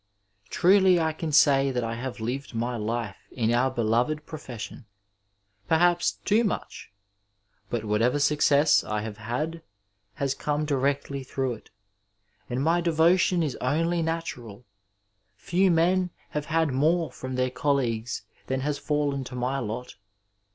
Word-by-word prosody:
Truly 190 -1 +5
I 160 -1 0
can 160 0 -4
say 140 -2 +5
that 125 -2 -1
I 115 0 -2
have 120 +1 -5
lived 125 +3 -4
my 120 +2 -1
life 110 -1 -3
in 115 -2 0
our 125 +2 +3
beloved 125 +5 0
profession 125 -8 -8 0.4
— 105 +1 -40
^perhaps 175 +1 +3
too 215 +3 +3
much! 205 - -4 0.8
but 115 -2 -2
whatever 115 +6 +2
success 145 0 +4
I 105 0 -2
have 105 -1 -6
had 150 +10 -3 0.5
has 140 -1 -1
come 150 +1 -2
directly 140 -1 -1
through 130 -1 -2
it, 110 - -13 0.8
and 125 +2 -1
my 170 +3 +2
devotion 170 +1 +3
is 145 -5 -2
only 165 +6 0
natural. 125 -9 -4 0.7
Few 185 +2 +1
men 180 +2 +2 0.2
have 150 -1 -3
had 160 -3 +1
more 160 +5 +2
from 130 0 -6
their 130 0 0
colleagues 125 -4 -1 0.2
than 130 0 -1
has 145 +1 -2
fallen 145 -2 -1
to 125 - -8
my 125 +2 -1
lot. 120 +1 -5
140 Hz, 145 wpm, -26 LUFS, 120-160 Hz, 0.8 s, Truly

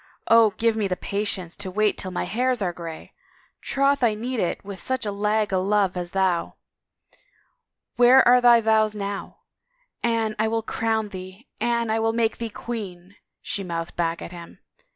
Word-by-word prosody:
" - - -52
Oh, 230 -1 +6
God 200 - -20
give 230 -1 +1
me 205 -3 0
patience 190 -2 -3
to 205 -2 -6
wait 210 +2 +1
till 190 - -2
my 180 - -3
hairs 250 +2 0
are 180 -4 -1
grayl 165 -2 -8 0.5
Troth 275 0 +1
I 225 -3 +3
need 240 +3 -3
it 180 +1 -2
with 200 -1 -7
such 260 -3 -2
a 205 - -1
lag 210 0 0
o' 185 - +2
love 195 -1 +1
as 175 -1 -4
thou!... 185 -2 0 1.4
Where 245 +2 +7
are 250 0 +6
thy 240 -1 +6
vows 220 -1 +2
now? 200 -1 -5 0.3
* - - -44
Anne, 225 -2 0
I 220 - +2
will 225 0 -1
crown 220 -1 -1
thee 185 +4 -10
— - - -37
Anne, 235 -1 0
I 220 - +1
will 225 0 +1
make 230 -1 0
thee 230 -1 -4
queen 200 -6 -7
1 200 - -23 0.2
' - - -59
" - - -63
she 200 - -3
mouthed 170 -2 -5
back 170 0 -1
at - - -8
him. 170 -1 -11
215 Hz, 205 wpm, -24 LUFS, 190-230 Hz, 1.4 s, Where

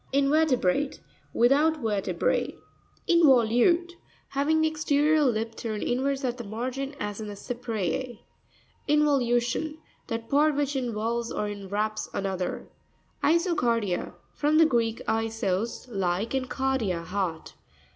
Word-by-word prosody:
InvE'RTEBRATE.— 280 - +2 0.3
Without 290 +7 +3
vertebra. 215 -7 0 0.6
In'voLtutre.—Having 315 +2 +2
the 315 - +4
exterior 310 0 +2
lip 225 -3 0
turned 220 -2 -4
inwards 270 +3 0
at 245 -1 -2
the - - -4
margin, 255 +6 -4
as 210 +1 -4
in 215 - -5
the 205 - -6
Cypree. 235 0 -3 0.7
Invoxvu'tion.—That 265 -3 0
part 295 +3 +3
which 285 0 -1
in 250 -3 -1
volves 230 +2 -2
or 210 - -2
inwraps 205 +1 -3
another. 190 -2 -2 0.6
Iso'carpia.—From 295 - 0
the 325 - +7
Greek, 230 -5 0
isos, 225 -1 -1
like, 195 0 -1
and 260 -1 -1
kardia, 255 -12 -1
heart. 180 -2 -3
240 Hz, 105 wpm, -27 LUFS, 215-290 Hz, 0.7 s, the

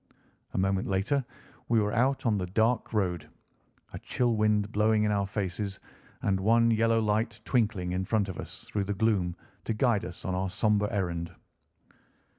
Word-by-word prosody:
A - - -1
moment 95 0 +1
later 100 +9 +1 0.5
we 115 -1 +4
were 105 -1 0
out 130 +3 +1
on 115 -3 +3
the 90 - -2
dark 110 +5 +1
road, 90 -7 -1 0.6
a - - -5
chill 120 -2 0
wind 105 -1 +2
blowing 105 0 +3
in 105 - +2
our 100 -1 0
faces, 100 0 -3 0.4
and 95 -1 +1
one 115 +4 +4
yellow 115 0 +3
light 110 +1 0
twinkling 105 -7 0
in 90 +1 -1
front 105 0 +1
of 95 - -6
us - - -8
through 100 -2 -2
the 100 +1 -2
gloom 95 -5 +1 0.3
to 115 - -1
guide 115 -3 +2
us 90 -1 -8
on 95 - -1
our 95 +1 -1
sombre 105 +1 +1
errand. 85 -3 -2
105 Hz, 175 wpm, -29 LUFS, 95-115 Hz, 0.6 s, we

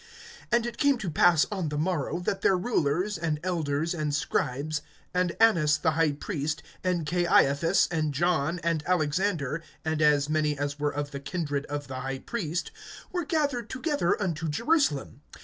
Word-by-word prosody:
(5)And 235 0 +3
it 235 -1 -5
came 280 -2 +4
to 190 -8 -4
pass 165 0 +5
on 185 -6 -2
the 150 - -3
morrow, 160 -1 -1
that 195 +2 -2
their 190 - +4
rulers, 180 -1 0
and 160 -2 -1
elders, 165 -3 -1
and 150 -3 -1
scribes, 150 +2 -1 0.3
(6)and 180 -1 +1
Annas 165 -10 +5
the 160 +1 +1
high 155 -1 +2
priest, 150 -1 -3 0.2
and 180 -3 0
Caiaphas, 170 0 +3
and 155 -3 0
John, 160 +1 +1
and 165 -2 +1
Alexander, 165 -3 0 0.2
and 160 -1 0
as 145 -1 +4
many 150 -1 +1
as 145 +1 -3
were 145 0 +1
of 145 0 -4
the 140 - -5
kindred 145 -1 -3
of 145 -1 -4
the 130 -1 -5
high 135 +1 -3
priest, 170 - -3 0.4
were 355 -3 -2
gathered 285 - 0
together 275 - 0
unto 165 -5 -2
Jerusalem. 230 - +1
160 Hz, 165 wpm, -27 LUFS, 145-185 Hz, 0.4 s, pass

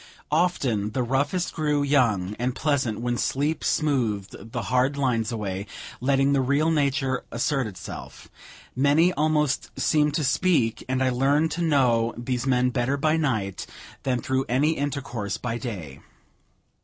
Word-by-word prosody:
Often 135 - +1
the 130 - 0
roughest 140 +8 0
grew 150 -2 0
young 110 -9 +2
and 125 +1 -1
pleasant 130 -7 0
when 120 0 -1
sleep 145 +4 -1
smoothed 115 -8 -1
the 120 -2 -3
hard 130 +6 +1
lines 125 -4 0
away, 100 -3 -4 0.3
letting 135 +2 +2
the 135 - +3
real 140 +5 +2
nature 140 -3 0
assert 130 +1 0
itself; 95 -5 -9 0.5
many 145 +7 +4
almost 150 -3 +1
seemed 150 -1 +2
to 155 - 0
speak, 135 -4 +1
and 130 0 +1
I 130 - +3
learned 140 +5 +2
to 175 - -3
know 125 -8 +2
these 125 +1 -2
men 125 -1 +2
better 130 +2 0
by 155 +2 +2
night 110 - -1 0.3
than 125 -2 0
through 130 0 0
any 140 +6 +3
intercourse 130 -9 -3
by 120 -1 -3
day. 90 - -6
130 Hz, 145 wpm, -25 LUFS, 115-145 Hz, 0.5 s, many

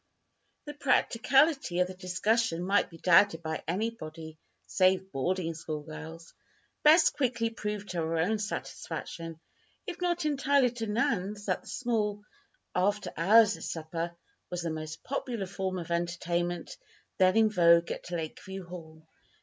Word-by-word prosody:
The 295 - -6
practicality 270 - +2
of 180 - +4
the 185 - -7
discussion 185 +1 0
might 200 +2 +2
be 165 - -12
doubted 170 -1 +4
by 160 0 -3
anybody 165 -6 -4 0.3
save 190 0 +2
boarding 165 +4 -1
school 155 -2 -5
girls. 160 +2 -9 0.5
Bess 315 +2 +6
quickly 240 -4 0
proved 210 -2 -5
to 180 - -4
her 165 0 -1
own 205 +7 +1
satisfaction, 165 -5 -5 0.5
if 360 -3 -6
not 345 -3 0
entirely 280 -3 +3
to 230 -2 -5
Nan's, 205 -2 -1
that 185 -3 0
the - - -19
small, 210 -4 -1 0.5
"after 195 0 0
hours 210 +4 +5
supper" 165 +1 -4 0.3
was 180 -1 -3
the 165 - -2
most 155 0 -6
popular 245 -6 -3
form 190 0 -3
of 170 -1 -6
entertainment 175 0 -2 0.4
then 185 +2 +5
in 220 -1 +5
vogue 170 -3 +5
at - - -6
Lakeview 180 +3 -5
Hall. 160 -2 -11
185 Hz, 140 wpm, -29 LUFS, 165-225 Hz, 0.5 s, Bess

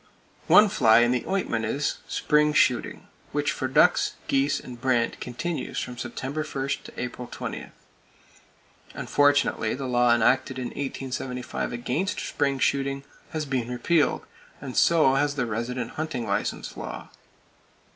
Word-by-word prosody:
One 210 - +8
fly 120 - +5
in 120 0 +3
the 125 -1 0
ointment 185 -13 -1
is—spring 150 +4 0
shooting; 125 -4 +1 0.2
which - - 0
for - - -2
ducks, - - +4
geese 135 +1 +2
and 120 -1 -10
brant 130 -3 +1
continues 155 +7 -4
from 125 - -5
September 140 +5 -4
1 140 -3 -4 0.2
to - - -11
April 125 0 -5
20. - - -5 1.3
Unfortunately 145 -6 +2
the 135 +1 -5
law 120 -1 +3
enacted 125 +4 +2
in 125 -1 -3
1875 130 -2 -4
against 130 +11 -2
spring 140 -1 -1
shooting 140 +1 0 0.3
has 155 -1 -3
been 130 -4 -2
repealed, 145 +6 +1 0.3
and 130 -3 -7
so 160 -5 +5
has 145 +1 +1
the 125 -3 0
resident 120 +2 -3
hunting 155 -7 -3
license 100 -1 -2
law - - -6 0.3
(1911). - - -20
130 Hz, 135 wpm, -26 LUFS, 120-145 Hz, 1.3 s, One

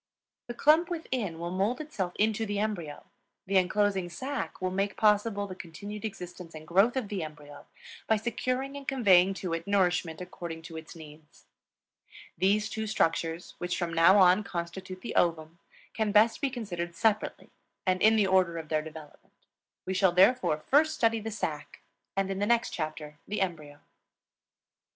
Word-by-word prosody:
The 240 - -6
clump 315 +6 +4
within 255 - -3
will 170 +1 -4
mold 200 +7 0
itself 205 - -4
into 220 +1 +1
the 205 -2 -2
embryo; 195 -8 -3 0.4
the 195 +1 +2
inclosing 190 0 +1
sac 265 - -5
will 185 0 -1
make 195 +1 -1
possible 210 -1 +2
the 190 - -7
continued 200 +4 -8
existence 180 -4 -8
and 155 0 -10
growth 200 +9 +3
of 250 -5 -2
the 200 -2 -3
embryo 145 -2 -10 0.4
by 220 - +4
securing 255 +5 -2
and 280 -1 -9
conveying 195 -8 +4
to 180 -3 -4
it 165 +2 -4
nourishment 180 -5 +1
according 170 -2 -7
to 165 0 -10
its 160 +2 -10
needs. 155 -1 -14 0.9
These 205 +3 +2
two 220 0 -4
structures, 165 -4 -1
which 175 0 -2
from 170 -2 -2
now 170 +4 +6
on 185 +1 +5
constitute 185 +1 -6
the - - -5
ovum, 165 -1 0 0.3
can 220 -2 0
best 220 +5 +4
be 280 - +1
considered 175 -9 -5
separately 215 +1 0 0.3
and 185 -1 +1
in 220 +1 +6
the 210 -2 +3
order 185 -3 +2
of 160 -2 -7
their 155 -1 +1
development. 155 -1 -12 0.5
We 190 - -2
shall 190 -2 +3
therefore 195 -2 +4
first 300 - +2
study 230 -5 +2
the 220 +1 -5
sac 150 -9 -5 0.4
and 195 0 0
in 195 - -3
the 205 - 0
next 235 +1 +2
chapter 155 -2 -5
the 210 - -3
embryo. 155 -6 -3
190 Hz, 170 wpm, -29 LUFS, 170-215 Hz, 0.9 s, now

